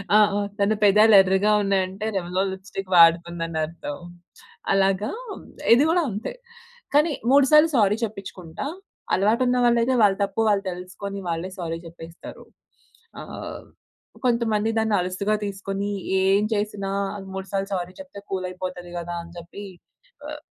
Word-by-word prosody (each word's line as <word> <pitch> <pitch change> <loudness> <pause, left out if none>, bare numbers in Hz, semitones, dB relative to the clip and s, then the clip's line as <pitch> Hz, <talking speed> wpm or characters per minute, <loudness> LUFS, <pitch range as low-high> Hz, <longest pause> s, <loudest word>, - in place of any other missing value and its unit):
ఆ! - - +9 0.2
ఆ! - - +1 0.2
తను 200 +2 +2
పెద్దలు 210 +2 +6
ఎర్రగా 190 +2 +2
ఉన్నాయంటే, 195 +1 -1
రేవ్‌లాన్ 185 +1 -1
లిప్స్‌స్టిక్ 190 0 -7
వాడుతుందని 165 -1 +4
అర్థం. 155 -3 -7 0.7
అలాగా, 195 +1 +2 0.6
ఇది 255 - +5
కూడా 350 +1 +3
అంతే. 210 - -5 0.6
కానీ 300 +3 +4 0.2
3 280 -1 +6
సార్లు 305 +2 +7
సారీ 210 -3 +4
చెప్పిచుకుంటా. 195 -2 -6 0.5
అలవాటు 215 +6 +2
ఉన్న 250 0 +2
వాళ్ళు 235 0 +4
అయితే 260 +3 +1
వాళ్ళ 195 -2 +4
తప్పు 200 - -3
వాళ్ళు 200 -1 +2
తెలుసుకొని 190 +2 -7
వాళ్ళే 165 +3 -3
సారీ 165 -1 -3
చెప్పేస్తారు. 165 +1 -11 0.8
ఆహ్, - - -8 0.6
కొంతమంది 225 -3 +1
దాన్ని 220 -1 +1
అలుసుగా 190 +4 -1
తీసుకొని, 195 +1 -4 0.3
ఏం 195 +2 +3
చేసినా 205 -1 -3 0.4
3 190 0 -5
సార్లు 195 0 -1
సారీ 180 0 -4
చెప్తే 275 -8 -11
కూల్ 185 -1 -2
అయిపోతది 180 -1 -7
కదా 175 0 -5
అని 170 - -14
చెప్పి 175 +4 -10 0.7
ఆహ్ - - -8
195 Hz, 135 wpm, -24 LUFS, 180-215 Hz, 0.8 s, ఆ